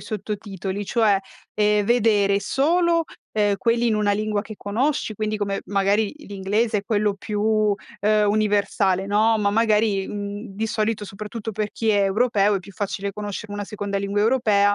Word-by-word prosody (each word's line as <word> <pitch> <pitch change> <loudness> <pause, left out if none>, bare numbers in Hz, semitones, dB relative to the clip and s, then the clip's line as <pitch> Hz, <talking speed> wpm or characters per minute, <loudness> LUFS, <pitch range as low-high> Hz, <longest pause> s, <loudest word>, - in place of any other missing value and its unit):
sottotitoli, 205 -2 -5
cioè, 215 -4 +3 0.3
ehm, 210 -1 +2
vedere 205 -4 +3
solo, 335 +6 +2 0.3
ehm, 205 -2 +2
quelli 235 +4 +1
in 220 - +2
una 210 -1 +2
lingua 210 0 -1
che 215 0 -9
conosci 225 +3 -1
quindi 215 +1 -2
come, 200 -1 -2
magari 200 +1 +1
l'inglese 210 -3 -1
è - - -5
quello, 210 -1 +1
più, 210 +1 +1 0.3
ehm 210 +1 +3 0.2
universale, 205 -3 +1
no; 215 +2 +3
ma 205 -1 +1
magari, 210 -2 +2
mhmm, 205 +2 -5
di 225 +1 -1
solito 215 -1 -1
soprattutto 210 +3 -6
per 210 0 -2
chi 225 - -3
è 205 -1 +3
europeo 205 0 +2
è - - +1
più 195 +2 -13
facile 200 0 -3
conoscere 205 0 -6
una 205 0 -4
seconda 200 -1 -3
lingua 200 +1 -1
europea, 210 -4 +3
210 Hz, 165 wpm, -23 LUFS, 200-220 Hz, 0.3 s, cioè